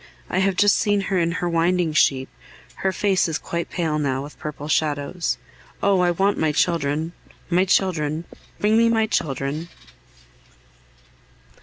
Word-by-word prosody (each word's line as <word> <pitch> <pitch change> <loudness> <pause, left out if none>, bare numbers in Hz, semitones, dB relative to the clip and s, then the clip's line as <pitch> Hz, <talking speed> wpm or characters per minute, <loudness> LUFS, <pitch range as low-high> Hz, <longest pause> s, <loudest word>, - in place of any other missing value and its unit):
I 185 - +1
have 190 0 +2
just 205 +2 +4
seen 205 -1 +2
her 190 -1 0
in 170 0 +1
her 175 - -2
winding 170 0 +1
sheet; 135 -6 +3 0.5
her 190 - 0
face 190 0 +1
is 160 -2 -1
quite 170 0 -4
pale 160 -4 -1
now 135 -2 -1
with 145 - -11
purple 150 -1 -6
shadows. 155 +2 0 0.5
Oh! 195 -1 +4
I 180 -1 +3
want 195 +4 +1
my 155 -1 +2
children! 155 0 0 0.4
my 180 +2 +4
children! 165 -5 +1 0.3
Bring 215 +2 +3
me 230 0 +4
my 225 -1 +3
children! 150 -3 -2
170 Hz, 150 wpm, -22 LUFS, 150-190 Hz, 0.5 s, just